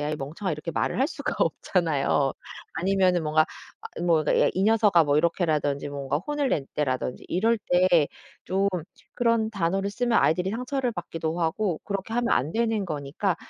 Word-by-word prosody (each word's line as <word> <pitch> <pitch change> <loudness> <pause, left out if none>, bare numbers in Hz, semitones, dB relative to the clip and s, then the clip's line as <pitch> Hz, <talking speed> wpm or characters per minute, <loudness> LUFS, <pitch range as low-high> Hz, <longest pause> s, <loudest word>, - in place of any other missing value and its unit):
야이 150 +1 -1
멍청아." 160 +7 -4
이렇게 150 +3 -5
말을 200 - -1
할 275 - +3
수가 - - -4
없잖아요. 145 -5 +1 0.4
아니면은 185 0 +2
뭔가 155 +1 +4 0.4
아 - - -9
뭐 165 -3 +3
그러니까 - - +3
"야 - - +4
이 190 - 0
녀석아." 210 -5 +5
뭐 145 0 +2
이렇게라든지 150 -4 0
뭔가 140 0 -2
혼을 290 - -2
낼 145 - 0
때라든지 130 -3 -2
이럴 225 +5 +2
때 180 -5 +3 0.4
좀 195 +2 +1 0.5
그런 230 -2 +1
단어를 195 0 -1
쓰면 240 +2 0
아이들이 180 +4 +2
상처를 250 +2 -2
받기도 165 -2 -4
하고 170 +1 0
그렇게 200 +2 -4
하면 240 0 +1
안 145 +6 +1
되는 225 -3 0
거니까 155 +5 -2
180 Hz, 375 characters per minute, -26 LUFS, 155-215 Hz, 0.5 s, 녀석아